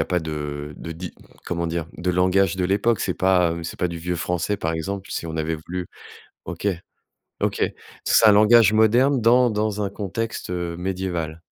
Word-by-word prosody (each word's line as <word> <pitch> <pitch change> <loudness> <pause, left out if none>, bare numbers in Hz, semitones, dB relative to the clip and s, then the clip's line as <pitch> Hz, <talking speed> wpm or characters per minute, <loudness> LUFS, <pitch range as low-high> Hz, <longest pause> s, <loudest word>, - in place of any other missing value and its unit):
a - - 0
pas 90 -2 0
de 75 -2 -5
de 85 - -7
di 85 +1 -7 0.3
comment 85 -1 -2
dire, 85 -1 -3
de 90 +1 -1
langage 90 0 +2
de 90 - 0
l'époque? 100 +4 +1
C'est - - -1
pas 90 -3 +2
c'est 80 - -7
pas 90 - +1
du 85 -1 -6
vieux 90 +1 -3
français, 90 +4 -1
par 80 -4 -2
exemple 95 +4 -4
si 85 - -4
on 80 - -5
avait 80 0 -1
voulu 90 +3 -6 0.6
OK, 90 +3 -4 0.7
OK, - - -1 0.4
c'est 110 - +5
un 105 - +8
langage 110 +1 +6
moderne 120 +6 +4
dans 120 +2 +4
dans 105 -1 -1
un 100 - -1
contexte, 105 +1 -4
heu, 85 -1 -3
médiéval. 90 -3 -3
90 Hz, 185 wpm, -23 LUFS, 85-105 Hz, 0.7 s, un